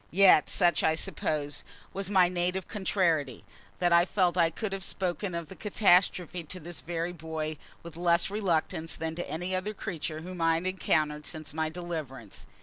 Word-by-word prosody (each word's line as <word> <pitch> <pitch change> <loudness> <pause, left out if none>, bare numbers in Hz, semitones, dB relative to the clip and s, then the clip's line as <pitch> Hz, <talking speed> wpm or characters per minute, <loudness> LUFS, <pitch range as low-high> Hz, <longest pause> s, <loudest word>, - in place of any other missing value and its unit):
Yet 185 -3 +6
such, 175 -4 +3
I 160 - +3
suppose, 155 -4 -2 0.3
was 195 0 -3
my 185 -3 +5
native 180 +1 -1
contrariety, 170 - 0 0.3
that 175 -1 +2
I 170 0 +7
felt 180 -2 +1
I 170 -2 +4
could 195 +4 -4
have 195 -1 -4
spoken 185 0 -2
of 170 -2 -4
the 190 - -10
catastrophe 180 -4 +2
to 185 +4 -7
this 170 0 -6
very 170 +1 -3
boy 155 -1 -4 0.3
with 170 -2 -10
less 170 +2 +2
reluctance 165 -5 -1
than 160 0 -3
to 175 +2 -5
any 175 +5 -2
other 205 +3 -3
creature 160 -6 -4
whom 180 +1 -7
I 165 0 +4
had 165 +2 -2
encountered 155 -5 0
since 155 -3 -5
my 160 0 -1
deliverance. 155 - -7
175 Hz, 175 wpm, -29 LUFS, 160-185 Hz, 0.3 s, I